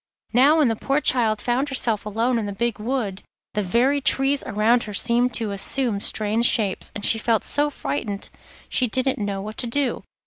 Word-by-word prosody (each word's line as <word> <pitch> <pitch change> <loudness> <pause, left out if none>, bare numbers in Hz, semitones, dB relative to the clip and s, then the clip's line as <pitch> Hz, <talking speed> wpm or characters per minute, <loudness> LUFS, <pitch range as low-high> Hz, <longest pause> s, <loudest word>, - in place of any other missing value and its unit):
Now 275 +6 +5
when 300 -4 +4
the 225 - 0
poor 275 +6 0
child 225 -7 +3
found 250 +6 -1
herself 230 -6 0
alone 230 +3 0
in 210 - -3
the 200 - -4
big 235 +1 -2
wood 215 -4 -3 0.3
the 210 - 0
very 245 +9 +1
trees 270 +1 +2
around 220 +3 +2
her 210 -1 -6
seemed 245 +2 +1
to 220 -3 -2
assume 210 +2 -1
strange 215 +3 +2
shapes, 200 -4 0
and 205 - -1
she 225 - +3
felt 225 -1 +1
so 290 +1 0
frightened 200 - -4 0.4
she 250 - +1
didn't 260 +3 -1
know 200 -2 -3
what 215 +1 -8
to 245 - -1
do. 265 +1 -1
230 Hz, 195 wpm, -22 LUFS, 210-260 Hz, 0.4 s, Now